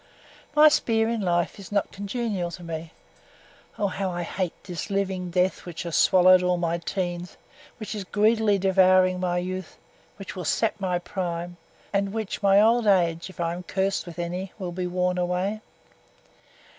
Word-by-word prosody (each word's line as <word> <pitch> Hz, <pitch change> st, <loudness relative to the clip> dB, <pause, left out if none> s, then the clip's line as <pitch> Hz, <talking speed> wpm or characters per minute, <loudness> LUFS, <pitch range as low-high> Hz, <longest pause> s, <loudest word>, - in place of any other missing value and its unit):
_ -, -, +1 dB
_My 305 Hz, 0 st, +9 dB
sphere 225 Hz, -5 st, +2 dB
in 230 Hz, -2 st, -1 dB
life 175 Hz, 0 st, 0 dB
is 200 Hz, -, -11 dB
not 200 Hz, -1 st, 0 dB
congenial 200 Hz, -3 st, -3 dB
to 175 Hz, +1 st, -9 dB
me. 165 Hz, -1 st, -6 dB, 0.9 s
Oh, 205 Hz, -, 0 dB
how 195 Hz, 0 st, -2 dB
I 175 Hz, -1 st, -3 dB
hate 180 Hz, 0 st, -4 dB
this 175 Hz, +1 st, -6 dB
living 190 Hz, -2 st, -1 dB
death 180 Hz, +2 st, 0 dB
which 175 Hz, -1 st, -6 dB
has 170 Hz, -3 st, -4 dB
swallowed 185 Hz, +2 st, +6 dB
all 180 Hz, 0 st, +1 dB
my 170 Hz, 0 st, -1 dB
teens, 175 Hz, 0 st, -4 dB, 0.4 s
which 215 Hz, -1 st, -6 dB
is 210 Hz, -2 st, -4 dB
greedily 210 Hz, +1 st, +2 dB
devouring 185 Hz, -1 st, +4 dB
my 180 Hz, -1 st, 0 dB
youth, 185 Hz, 0 st, -4 dB, 0.4 s
which 195 Hz, -, -8 dB
will 180 Hz, -, -5 dB
sap 220 Hz, +7 st, +1 dB
my 185 Hz, -2 st, 0 dB
prime, 175 Hz, -1 st, -4 dB, 0.4 s
and 200 Hz, 0 st, +1 dB
in 195 Hz, -, -8 dB
which 220 Hz, -2 st, -4 dB
my 200 Hz, 0 st, +5 dB
old 225 Hz, +1 st, +4 dB
age, 170 Hz, -3 st, +2 dB
if 185 Hz, -, -15 dB
I 170 Hz, 0 st, 0 dB
am 175 Hz, -, -6 dB
cursed 190 Hz, +1 st, -1 dB
with 170 Hz, -, -9 dB
any, 180 Hz, +2 st, -4 dB
will 185 Hz, -4 st, -5 dB
be 180 Hz, +1 st, -3 dB
worn 180 Hz, 0 st, 0 dB
away! 180 Hz, +4 st, -1 dB
185 Hz, 180 wpm, -25 LUFS, 175-200 Hz, 0.9 s, My